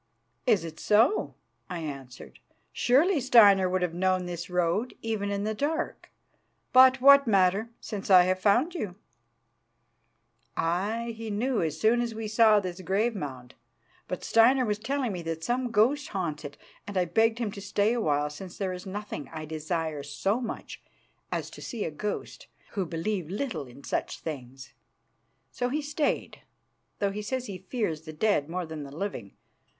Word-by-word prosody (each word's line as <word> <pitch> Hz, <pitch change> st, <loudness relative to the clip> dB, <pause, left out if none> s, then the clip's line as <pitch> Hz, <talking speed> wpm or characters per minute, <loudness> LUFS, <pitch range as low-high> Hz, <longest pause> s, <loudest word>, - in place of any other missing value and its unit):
"Is 210 Hz, -8 st, +4 dB
it 160 Hz, -1 st, -8 dB
so?" 225 Hz, -, +3 dB, 0.3 s
I 180 Hz, -, -4 dB
answered. 135 Hz, -5 st, -8 dB, 0.3 s
"Surely 295 Hz, +8 st, +3 dB
Steinar 205 Hz, -7 st, +6 dB
would 185 Hz, 0 st, 0 dB
have 175 Hz, -2 st, -1 dB
known 185 Hz, +1 st, +1 dB
this 175 Hz, 0 st, -5 dB
road 180 Hz, +7 st, 0 dB
even 220 Hz, -3 st, -2 dB
in 200 Hz, 0 st, -2 dB
the 215 Hz, +1 st, -1 dB
dark. 315 Hz, +8 st, -2 dB, 0.6 s
But 260 Hz, 0 st, +7 dB
what 280 Hz, 0 st, +8 dB
matter, 195 Hz, +2 st, +3 dB
since 205 Hz, -2 st, -6 dB
I 185 Hz, -2 st, +8 dB
have 185 Hz, +1 st, +1 dB
found 240 Hz, -, +3 dB
you?" 210 Hz, -, -4 dB, 1.6 s
"Aye, 210 Hz, +8 st, -1 dB
he 225 Hz, 0 st, -6 dB
knew 235 Hz, +4 st, 0 dB
as 160 Hz, -2 st, -2 dB
soon 230 Hz, +5 st, +3 dB
as 235 Hz, -2 st, -3 dB
we 220 Hz, 0 st, -4 dB
saw 215 Hz, -1 st, +5 dB
this 185 Hz, -1 st, -5 dB
grave 205 Hz, +6 st, 0 dB
mound. 130 Hz, -8 st, -6 dB, 0.5 s
But 180 Hz, -, -5 dB
Steinar 250 Hz, +3 st, +5 dB
was 210 Hz, -2 st, -1 dB
telling 260 Hz, +1 st, -1 dB
me 180 Hz, -3 st, -4 dB
that 165 Hz, -1 st, -4 dB
some 245 Hz, +3 st, 0 dB
ghost 255 Hz, +7 st, +2 dB
haunts 170 Hz, -, -3 dB
it, 145 Hz, -, -8 dB, 0.3 s
and 205 Hz, -2 st, -4 dB
I 180 Hz, -, +3 dB
begged 225 Hz, +6 st, +2 dB
him 230 Hz, -4 st, -2 dB
to 200 Hz, -, -8 dB
stay 205 Hz, +3 st, +1 dB
awhile, 150 Hz, -10 st, 0 dB
since 180 Hz, +4 st, -9 dB
there 190 Hz, -2 st, -2 dB
is 180 Hz, +2 st, -8 dB
nothing 200 Hz, -7 st, -6 dB
I 155 Hz, -1 st, -6 dB
desire 155 Hz, -1 st, -3 dB
so 195 Hz, -, -1 dB
much 235 Hz, -, -6 dB, 0.5 s
as -, -, -3 dB
to -, -, -11 dB
see 225 Hz, -4 st, -4 dB
a 160 Hz, -, -3 dB
ghost, 205 Hz, +7 st, -5 dB, 0.2 s
who 195 Hz, -4 st, -2 dB
believe 165 Hz, +1 st, -3 dB
little 210 Hz, -, -3 dB
in 125 Hz, +3 st, -14 dB
such -, -, -2 dB
things. 135 Hz, -4 st, -8 dB, 0.8 s
So 245 Hz, -, -2 dB
he 300 Hz, +4 st, -1 dB
stayed, 300 Hz, +1 st, -2 dB, 0.6 s
though 200 Hz, -1 st, 0 dB
he 210 Hz, +1 st, -4 dB
says 255 Hz, +4 st, -3 dB
he 195 Hz, -5 st, -6 dB
fears 190 Hz, -11 st, -1 dB
the 155 Hz, -1 st, -9 dB
dead 155 Hz, -3 st, +1 dB
more 180 Hz, +1 st, -3 dB
than 160 Hz, -1 st, -7 dB
the 140 Hz, -, -7 dB
living. 160 Hz, -, -5 dB
200 Hz, 170 wpm, -28 LUFS, 165-230 Hz, 1.6 s, what